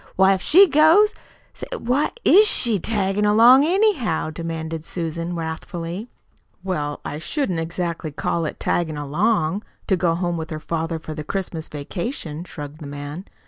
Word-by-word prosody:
Why, 190 Hz, +1 st, +5 dB
if 190 Hz, -, -2 dB
she 375 Hz, -, +7 dB
goes 320 Hz, +8 st, +5 dB, 0.4 s
Say, -, -, -8 dB
why 255 Hz, +5 st, 0 dB, 0.2 s
IS 420 Hz, +3 st, +7 dB
she 230 Hz, -, +4 dB
taggin' 200 Hz, 0 st, -1 dB
along, 230 Hz, +6 st, +6 dB
anyhow?" 340 Hz, -, +1 dB
demanded 160 Hz, -1 st, -5 dB
Susan 170 Hz, 0 st, -4 dB
wrathfully. 170 Hz, +5 st, -5 dB, 0.5 s
"Well, 150 Hz, -6 st, -3 dB
I 150 Hz, -, -4 dB
shouldn't 185 Hz, -, -2 dB
exactly 170 Hz, -1 st, -3 dB
call 165 Hz, +3 st, -2 dB
it -, -, -5 dB
'taggin' 160 Hz, -3 st, -1 dB
along' 165 Hz, +5 st, 0 dB, 0.2 s
to 190 Hz, -, +2 dB
go 170 Hz, -2 st, +1 dB
home 175 Hz, -1 st, -2 dB
with 160 Hz, -1 st, -5 dB
her 155 Hz, -, -5 dB
father 165 Hz, +1 st, -3 dB
for 160 Hz, -1 st, -7 dB
the 150 Hz, 0 st, -6 dB
Christmas 170 Hz, -1 st, -4 dB
vacation," 160 Hz, -, -5 dB
shrugged 150 Hz, -3 st, -9 dB
the 145 Hz, -, -7 dB
man. 145 Hz, +5 st, -7 dB
170 Hz, 155 wpm, -22 LUFS, 160-210 Hz, 0.5 s, she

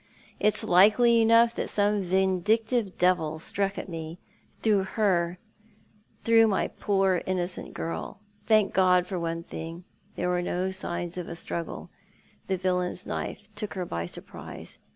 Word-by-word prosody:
It's 210 Hz, 0 st, +2 dB
likely 215 Hz, +6 st, +5 dB
enough 230 Hz, +1 st, +5 dB
that -, -, -3 dB
some 205 Hz, 0 st, +1 dB
vindictive 190 Hz, +4 st, +1 dB
devil 165 Hz, -4 st, +2 dB
struck 195 Hz, +4 st, -2 dB
at -, -, -5 dB
me, 165 Hz, -1 st, -6 dB, 0.4 s
through 210 Hz, -3 st, +2 dB
her, 180 Hz, -5 st, +1 dB, 0.9 s
through 225 Hz, 0 st, +5 dB
my 200 Hz, -3 st, 0 dB
poor, 195 Hz, -3 st, +1 dB
innocent 180 Hz, -1 st, -3 dB
girl. 80 Hz, -, -5 dB, 0.3 s
Thank 215 Hz, -3 st, +4 dB
God 180 Hz, -1 st, +4 dB
for 185 Hz, -1 st, -4 dB
one 165 Hz, 0 st, -3 dB
tiling, 165 Hz, +1 st, -7 dB, 0.3 s
there 180 Hz, -, -1 dB
were 180 Hz, 0 st, +1 dB
no 180 Hz, +1 st, -1 dB
signs 175 Hz, -2 st, -3 dB
of 175 Hz, -, -6 dB
a 170 Hz, -, -5 dB
struggle. 170 Hz, 0 st, -5 dB, 0.6 s
The 190 Hz, -, 0 dB
villain's 180 Hz, -1 st, -1 dB
knife 210 Hz, +1 st, -5 dB
took 210 Hz, -1 st, -5 dB
her 185 Hz, -2 st, -2 dB
by 85 Hz, -, -4 dB
surprise. -, -, -9 dB
185 Hz, 145 wpm, -27 LUFS, 175-210 Hz, 0.9 s, likely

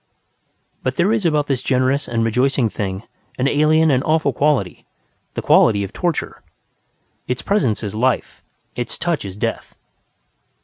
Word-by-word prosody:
But 130 Hz, 0 st, -2 dB
there 190 Hz, +6 st, +2 dB
is 215 Hz, -6 st, +1 dB
about 150 Hz, -2 st, +1 dB
this 135 Hz, -4 st, -1 dB
generous 130 Hz, +2 st, +1 dB
and 115 Hz, -1 st, 0 dB
rejoicing 125 Hz, +1 st, +1 dB
thing 95 Hz, -1 st, -4 dB, 0.3 s
an 130 Hz, -, +1 dB
alien 155 Hz, +2 st, +3 dB
and 130 Hz, 0 st, +2 dB
awful 155 Hz, -3 st, +1 dB
quality: 140 Hz, -11 st, 0 dB, 0.5 s
the -, -, -3 dB
quality 100 Hz, -3 st, +4 dB
of 100 Hz, -, -7 dB
torture. 175 Hz, -3 st, -2 dB, 0.9 s
Its 125 Hz, -, -3 dB
presence 135 Hz, -, 0 dB
is 105 Hz, -1 st, -4 dB
life; 125 Hz, +3 st, -1 dB, 0.3 s
its 120 Hz, -1 st, -4 dB
touch 170 Hz, -2 st, -1 dB
is 100 Hz, -1 st, -7 dB
death. -, -, -4 dB
130 Hz, 145 wpm, -20 LUFS, 115-155 Hz, 0.9 s, quality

